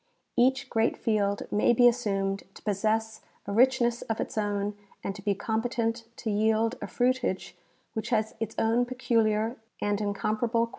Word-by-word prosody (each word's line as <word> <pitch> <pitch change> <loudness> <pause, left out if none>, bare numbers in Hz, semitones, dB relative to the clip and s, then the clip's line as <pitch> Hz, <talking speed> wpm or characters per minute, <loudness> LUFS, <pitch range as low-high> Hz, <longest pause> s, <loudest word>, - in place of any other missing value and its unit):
Each 265 +2 +3
great 225 -2 +1
field 205 -2 0
may 210 +3 +4
be 245 +1 +6
assumed 195 -5 0
to - - -14
possess 215 +2 0 0.2
a 200 - -4
richness 240 +1 +3
of 225 - -3
its - - -3
own 205 -1 -1 0.3
and 195 - -2
to 195 - -10
be 200 0 +1
competent 230 +2 -1
to 220 - -2
yield 220 +2 +2
a - - -4
fruitage 250 -6 0 0.4
Avhich 220 - -3
has 220 -3 +1
its 225 -1 -3
own 230 +2 +2
peculiar 230 -2 +1 0.2
and 205 0 0
incomparable 215 +3 0
qualities. - - -14
220 Hz, 160 wpm, -28 LUFS, 205-240 Hz, 0.4 s, be